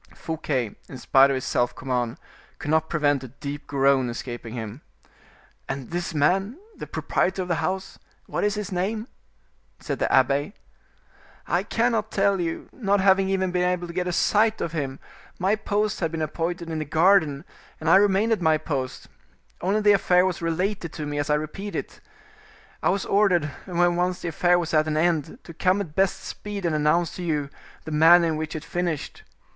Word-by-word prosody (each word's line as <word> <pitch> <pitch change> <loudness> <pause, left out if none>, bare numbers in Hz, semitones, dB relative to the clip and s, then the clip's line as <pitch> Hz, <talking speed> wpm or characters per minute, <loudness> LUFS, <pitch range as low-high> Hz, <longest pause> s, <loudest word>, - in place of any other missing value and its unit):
Fouquet, 140 -8 -3
in 130 - -8
spite 135 +2 +5
of 135 - +1
his 130 - -3
self 120 0 0
command, 125 -3 -2 0.4
could 150 - -4
not 160 0 +2
prevent 145 -4 +1
a - - -6
deep 140 +3 -7
groan 135 -2 +2
escaping 120 -1 -6
him. 110 +3 -6 0.9
"And 135 -1 -5
this 175 -1 -3
man, 190 - +1 0.2
the - - -8
proprietor 190 +1 -1
of - - -8
the 165 -4 0
house, 190 +4 -3 0.3
what - - -3
is 205 0 +1
his 210 -1 -4
name?" 210 +5 -2 0.7
said - - -4
the - - 0
abbe. 140 - +2 0.9
"I - - +1
cannot 225 -2 0
tell 195 -2 +1
you, 165 -1 -3
not 200 -5 +1
having 190 0 +4
even 190 -1 0
been 180 0 0
able 180 -1 -1
to 170 - -8
get 180 0 -1
sight 215 +4 +3
of 165 - -2
him; 140 -5 -3 0.4
my 190 +3 +2
post 210 -1 -1
had 165 -3 -1
been 160 -1 -2
appointed 170 +2 -3
in 160 - -2
the 155 - -3
garden, 160 -1 +3 0.3
and 160 - -5
I 165 - +7
remained 205 +2 +3
at 220 - +1
my 160 -2 +4
post: 135 -4 -4 0.5
only 200 +4 +1
the 205 0 +5
affair 180 -2 +4
was 185 -2 -2
related 170 +1 -1
to 150 - -5
me 145 0 -3
as 145 +2 -2
I 150 - +4
repeat 175 +7 -5
it. - - -5 0.8
I - - +2
was 195 - 0
ordered, 195 -6 +3 0.2
when 175 -1 +2
once 180 +1 0
the 175 - -3
affair 175 +2 +3
was 170 -1 -3
at 155 0 +3
an 155 0 0
end, 165 +3 0
to 170 - -11
come 185 +4 +2
at 175 -7 -5
best 190 +2 +1
speed 205 -2 -6
and 165 - +1
announce 155 +3 +1
to 180 - -5
you 150 -4 -1 0.3
the 160 - -7
manner 165 +3 +6
in 160 - -1
which 155 0 -4
it 155 - -6
finished. 175 -4 -3
170 Hz, 195 wpm, -25 LUFS, 150-190 Hz, 0.9 s, I